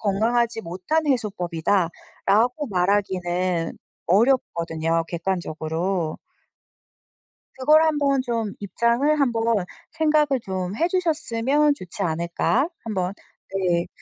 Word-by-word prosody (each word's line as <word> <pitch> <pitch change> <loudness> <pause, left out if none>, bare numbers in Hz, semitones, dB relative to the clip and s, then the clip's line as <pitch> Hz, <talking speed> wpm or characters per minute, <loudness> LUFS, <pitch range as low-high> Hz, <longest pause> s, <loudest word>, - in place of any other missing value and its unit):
건강하지 225 +3 +1
못한 185 - -1
해소법이다." 190 - 0 0.4
라고 245 +8 +2
말하기는 180 -3 0 0.3
어렵거든요. 170 -7 +2
객관적으로. 170 -1 -2 1.4
그걸 305 +4 +5
한번 285 -3 +2
좀 230 -4 -2
입장을 235 - +1
한번 230 -6 +1 0.3
생각을 300 -4 +2
좀 185 0 -3
해주셨으면 300 -5 +1
좋지 180 -9 -7
않을까, 170 - 0 0.2
한번. 190 -4 -2 0.4
네, 175 -2 +1
205 Hz, 230 characters per minute, -23 LUFS, 180-265 Hz, 1.4 s, 그걸